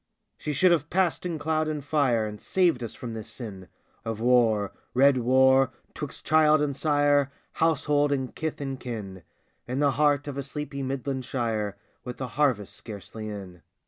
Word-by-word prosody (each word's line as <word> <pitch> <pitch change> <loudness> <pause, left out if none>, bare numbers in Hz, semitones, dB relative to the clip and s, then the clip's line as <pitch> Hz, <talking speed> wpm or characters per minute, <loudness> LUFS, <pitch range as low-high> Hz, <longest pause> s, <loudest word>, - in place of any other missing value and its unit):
She 150 - -4
should 175 +6 +4
have 160 -3 +1
passed 180 -1 +1
in 170 -2 -3
cloud 155 +1 0
and 150 -3 -3
fire 135 -7 +2
And 105 -1 -7
saved 175 -9 +2
us 115 - -5
from 120 -2 -6
this 110 -2 -7
sin 100 -7 -8 0.4
Of 115 -2 -4
war 115 -4 +3
— - - -40
red 140 +2 +6
Avar 130 +2 +4
— - - -37
'twixt - - -6
child 155 0 +5
and 145 -2 0
sire, 145 -2 +2 0.2
Household 150 -2 +2
and 130 -3 -1
kith 160 -1 -4
and 135 -2 -4
kin, 105 -7 -6 0.5
In 125 +2 -3
the 145 0 +3
heart 145 +1 +2
of 140 -1 -4
a - - 0
sleepy 140 0 -5
Midland 135 0 -3
shire, 110 -6 -2 0.3
With 125 -1 -6
the 130 -2 -4
harvest 130 -8 +1
scarcely 110 0 -8
in. 95 -4 -8
135 Hz, 180 wpm, -27 LUFS, 115-150 Hz, 0.5 s, red